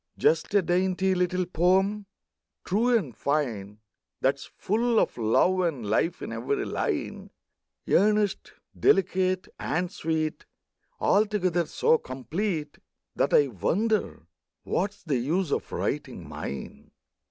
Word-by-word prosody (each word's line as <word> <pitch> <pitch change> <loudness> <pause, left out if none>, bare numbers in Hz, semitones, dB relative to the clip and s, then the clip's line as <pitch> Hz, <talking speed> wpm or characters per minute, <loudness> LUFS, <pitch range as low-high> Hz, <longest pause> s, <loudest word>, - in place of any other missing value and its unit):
Just 455 +3 +2
a 200 - +5
dainty 185 +2 +1
little 180 0 0
poem, 190 +4 +1 0.6
true 235 +6 +3
and 140 - -5
fine, 110 -8 -2 0.4
That 135 - +4
is 135 - -11
full 225 +3 +1
of - - 0
love 120 +11 +2
and 160 -11 -1
life 110 +11 0
in - - -5
every 415 -2 -2
line, - - -3 0.6
Earnest, 210 0 +2 0.3
delicate, 185 -1 +2
and 175 +3 -1
sweet, 160 -4 -2 0.5
Altogether 185 -5 +2
so 160 - +2
complete 155 +5 -4 0.4
That - - +1
I 145 -2 +5
wonder 200 - -1 0.4
what's 205 +2 -2
the 145 -6 0
use 160 +7 -1
of - - -2
writing - - -3
mine. 70 -1 -7
180 Hz, 120 wpm, -27 LUFS, 150-200 Hz, 0.6 s, a